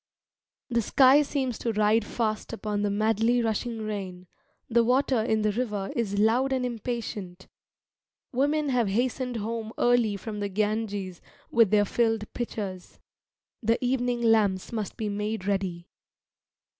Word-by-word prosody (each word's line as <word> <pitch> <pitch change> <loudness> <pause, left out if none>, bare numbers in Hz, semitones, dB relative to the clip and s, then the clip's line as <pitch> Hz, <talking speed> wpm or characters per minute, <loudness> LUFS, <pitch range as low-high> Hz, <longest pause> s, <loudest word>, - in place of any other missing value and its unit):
The 235 -1 +1
sky 265 +5 +6
seems 265 -5 -2
to 230 - -1
ride 215 +1 +3
fast 215 0 -2
upon 210 -2 -2
the 205 - +1
madly 220 +3 +2
rushing 225 0 -2
rain; 190 -4 -5 0.4
the 235 0 +3
water 255 0 +2
in 220 -1 +1
the 215 - +2
river 205 -4 -2
is 205 -4 -1
loud 235 +6 +3
and 260 -1 0
impatient; 220 -6 -5 0.8
women 290 +3 +1
have 245 -4 +2
hastened 245 +4 -1
home 225 0 -4
early 240 -4 +3
from 210 +1 -6
the 205 0 -2
Ganges 205 -2 -2 0.3
with 230 -3 +5
their 205 0 +4
filled 225 0 0
pitchers. 200 -6 -5 0.6
The 230 +1 +2
evening 245 -1 0
lamps 210 -5 +2
must 215 -4 -4
be 220 - -2
made 210 0 -3
ready. 190 -4 -2
220 Hz, 140 wpm, -27 LUFS, 205-240 Hz, 0.8 s, sky